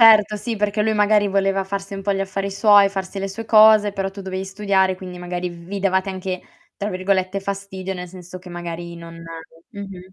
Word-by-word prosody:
Certo, 215 -2 +7
sì, 230 +3 -3
perché 210 0 0
lui 220 +1 +2
magari 210 0 +4
voleva 195 0 +1
farsi 195 +1 -5
un 195 - -6
po' 200 +1 +1
gli 195 - -2
affari 195 0 -2
suoi, 205 0 +6
farsi 195 0 -5
le 195 - -2
sue 195 +4 -6
cose, 215 -1 +7
però 195 -1 -3
tu 200 - -9
dovevi 190 0 -4
studiare, 190 -1 +1
quindi 180 -1 -9
magari 180 0 -3
vi 175 +3 -7
davate 190 0 +1
anche, 185 -1 -4 0.4
tra 205 - -3
virgolette 185 0 0
"fastidio" 195 -1 -5
nel 180 0 -6
senso 180 0 -10
che 180 0 -13
magari 175 0 -6
non 165 0 -10 0.5
mh-mh. 190 -2 -9
195 Hz, 200 wpm, -21 LUFS, 185-200 Hz, 0.5 s, Certo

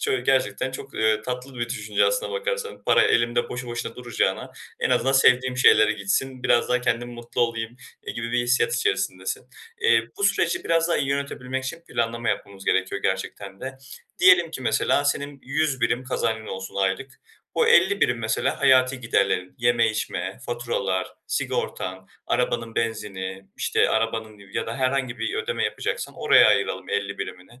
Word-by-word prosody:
Çö 420 -2 0
gerçekten - - +1
çok, 425 -1 -9
eee, 110 -1 +2
tatlı 125 +2 -5
bir 120 0 -2
düşünce 105 -1 0
aslında - - 0
bakarsan. 480 -1 -3
Para - - +5
elimde 120 +1 +2
boşu 125 0 -5
boşuna 120 0 -5
duracağına 120 -3 -1 0.3
en - - +1
azından 135 - +2
sevdiğim 130 -1 +4
şeylere 110 -4 +6
gitsin 125 +7 -2
biraz 120 - +3
daha 125 0 +2
kendim 120 -1 -1
mutlu 120 +1 -5
olayım, 115 0 -1 0.3
eee, - - -3
gibi 115 +1 -4
bir 125 - +2
hissiyat 125 - +2
içerisindesin. 435 -2 -1 0.3
Eee, 470 0 +4
bu 405 - -1
süreci 370 -1 +1
biraz 165 0 +2
daha 170 - +2
iyi 135 - -1
yönetebilmek 130 -2 -3
için 165 +6 -5
planlama 115 0 -1
yapmamız 100 -1 -3
gerekiyor 95 0 0
gerçekten 95 +1 -3
de. 130 0 -6 0.4
Diyelim 180 -2 +6
ki 130 - -6
mesela, 125 +5 +2
senin 145 0 -1
100 140 -1 -1
birim 120 +2 +1
kazancın 110 -3 -2
olsun 95 0 -6
aylık. 100 +8 -2 0.3
Bu, 470 - +3
50 470 -4 +5
birim 125 -1 +2
mesela 110 -1 -1
hayati 130 0 +4
giderlerin; 100 -5 0
yeme, 120 -1 +3
içme, 95 -2 -4
faturalar, 120 -6 -1 0.2
sigortan, 95 0 -3 0.2
arabanın 115 -2 -1
benzini, 95 -4 -3
işte, - - +2
arabanın 110 -1 -1
ya - - -2
da 115 - -4
herhangi 130 -2 0
bir 400 - -2
ödeme 465 +2 -1
yapacaksan - - -3
oraya - - +6
ayıralım - - 0
50 455 0 -2
birimini. 95 +8 -8
120 Hz, 165 wpm, -24 LUFS, 110-140 Hz, 0.4 s, şeylere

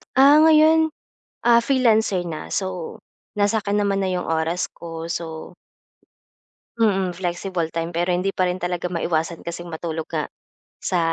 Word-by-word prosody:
Ah, 285 +4 +7
ngayon, 315 0 +5 0.5
ah, 235 -1 +6
freelancer 220 -8 +2
na 160 -2 -6
so, 185 -4 -3 0.4
nasa 205 +1 +2
'kin 200 +1 -1
naman 200 -1 +1
na 190 - 0
'yung 180 -1 -2
oras 165 +2 0
ko, 165 -1 -7
so 165 0 -5 1.3
Mm, 195 -5 +2
flexible 175 -1 -3
time 165 +1 -4
pero 175 +1 0
hindi 190 +2 0
pa 185 -1 0
rin 180 - -1
talaga 180 -1 -3
maiwasan 170 -1 -2
kasing 175 +1 -6
matulog 160 -1 -5
nga, 155 -2 -3 0.5
sa, 180 - 0
180 Hz, 145 wpm, -22 LUFS, 170-205 Hz, 1.3 s, Ah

